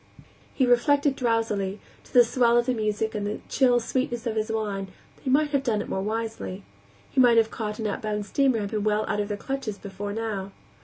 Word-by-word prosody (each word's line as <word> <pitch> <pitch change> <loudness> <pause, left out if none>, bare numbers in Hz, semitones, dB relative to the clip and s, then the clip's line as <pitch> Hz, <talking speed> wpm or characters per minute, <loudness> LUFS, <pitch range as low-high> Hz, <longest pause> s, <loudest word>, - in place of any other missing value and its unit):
He 260 - +3
reflected 280 +3 +3
drowsily, 225 -5 0 0.3
to - - -19
the 245 - +7
swell 240 0 +3
of 240 - +3
the 255 - +1
music 215 -1 -1
and 205 -1 -2
the 210 - -3
chill 250 -3 +4
sweetness 240 0 -2
of 225 -2 -1
his 220 +1 -1
wine, 205 -3 -2 0.3
that - - -23
he 270 - -3
might 295 +3 +3
have 280 -2 +2
done 230 -6 0
it - - -5
more 190 - -1
wisely. 210 - -4 0.5
He 260 - +4
might 240 -2 +6
have 225 -1 +4
caught 210 -2 -4
an 220 - -4
outbound 210 0 -2
steamer 265 +2 +2
and 205 -2 -3
been 215 -2 -1
well 215 0 +1
out 210 - -1
of 205 - -1
their 205 -1 -3
clutches 270 -3 -4
before 205 0 -6
now. 205 -3 -4
220 Hz, 220 wpm, -26 LUFS, 210-245 Hz, 0.5 s, the